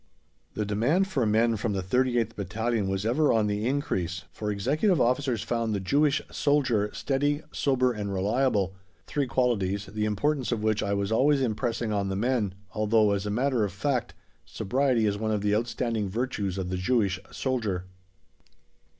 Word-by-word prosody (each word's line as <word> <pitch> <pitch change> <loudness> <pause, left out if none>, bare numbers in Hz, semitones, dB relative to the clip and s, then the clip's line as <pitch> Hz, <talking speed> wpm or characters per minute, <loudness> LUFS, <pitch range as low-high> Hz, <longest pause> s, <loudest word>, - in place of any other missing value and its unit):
The 105 - -1
demand 125 - +2
for 135 - 0
men 110 +1 +3
from 105 0 -1
the 95 -1 -2
38th 120 +1 +1
Battalion 110 +2 -1
was 95 +1 -2
ever 145 +7 +3
on 110 -2 +3
the 105 +2 -1
increase, 95 - -1
for 105 +5 -4
executive 145 - +1
officers 125 -2 +1
found 115 -2 -1
the - - -1
Jewish 145 +10 +2
soldier 130 -8 +1
steady, 145 +2 -1
sober 130 -3 +1
and 105 -2 -4
reliable, 100 0 +1 0.3
three 140 -2 -1
qualities, 100 -6 0
the 105 +2 -3
importance 130 +6 0
of 110 -3 -1
which 110 -1 +1
I 100 0 0
was 100 +1 -1
always 140 +5 +4
impressing 115 -1 -1
on 100 -1 0
the 95 - -2
men, 110 -3 0 0.2
although, 110 0 +3
as 100 0 -1
a - - -1
matter 125 +2 +1
of 100 - -1
fact, 125 +6 -2 0.3
sobriety 125 +1 0
is 100 -1 0
one 110 0 -1
of 105 -2 0
the 105 0 +1
outstanding 115 -1 -1
virtues 105 -4 -2
of 95 -2 -3
the 95 - -2
Jewish 100 -1 +1
soldier. 110 -9 -2
110 Hz, 170 wpm, -27 LUFS, 100-130 Hz, 0.3 s, always